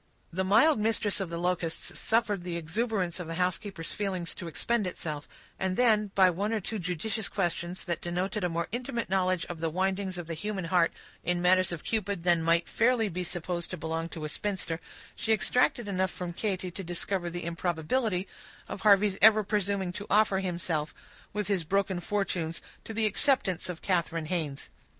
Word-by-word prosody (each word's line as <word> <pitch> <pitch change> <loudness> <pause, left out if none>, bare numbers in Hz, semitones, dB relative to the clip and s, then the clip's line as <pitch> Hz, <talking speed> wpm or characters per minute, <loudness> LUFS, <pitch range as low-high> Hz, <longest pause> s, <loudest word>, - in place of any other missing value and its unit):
The 190 +2 0
mild 220 +9 +5
mistress 210 -1 +2
of 190 -3 -2
the 170 - -4
Locusts 175 -1 -2
suffered 215 -5 +1
the 175 -1 -3
exuberance 180 +1 -1
of 175 - -5
the 165 - -4
housekeeper's 180 0 -2
feelings 190 -5 -2
to 175 - -7
expend 215 +5 0
itself, 150 -4 -5 0.3
and 190 -1 0
then, 215 -4 +4
by 185 -2 +6
one 200 +5 -1
or 225 - +1
two 215 +2 -4
judicious 190 +5 -2
questions, 175 -2 -2
that 170 -2 -2
denoted 180 +4 -2
a 180 - +2
more 170 0 -1
intimate 240 -3 -3
knowledge 185 -2 +2
of 175 -2 -7
the 165 0 0
windings 190 +2 -1
of 175 - -5
the 165 - -4
human 195 +2 -3
heart 170 -1 +3 0.3
in 175 0 +1
matters 185 +1 +4
of 170 -3 -5
Cupid 205 -5 -1
than 175 -2 +4
might 170 +1 +2
fairly 230 -2 +2
be 180 0 -3
supposed 175 0 -2
to 185 - -4
belong 160 +1 -3
to 160 -3 -6
a - - -3
spinster, 180 -2 -2 0.4
she 220 - +2
extracted 240 +1 +2
enough 190 -1 +1
from 180 -2 -5
Katy 185 -2 -2
to 190 +3 -6
discover 175 +1 -2
the 175 0 -5
improbability 180 +4 0 0.4
of - - -6
Harvey's 200 -1 +5
ever 215 0 +8
presuming 200 -2 0
to 205 +3 -6
offer 205 -2 +4
himself, 170 -4 -2 0.4
with 210 -1 -2
his 195 -4 +1
broken 190 +2 0
fortunes, 175 -4 -1 0.3
to 225 - -6
the 225 0 +2
acceptance 210 - +2
of 175 -2 -6
Katharine 170 -3 0
Haynes. 155 -5 -3
185 Hz, 185 wpm, -29 LUFS, 170-205 Hz, 0.4 s, ever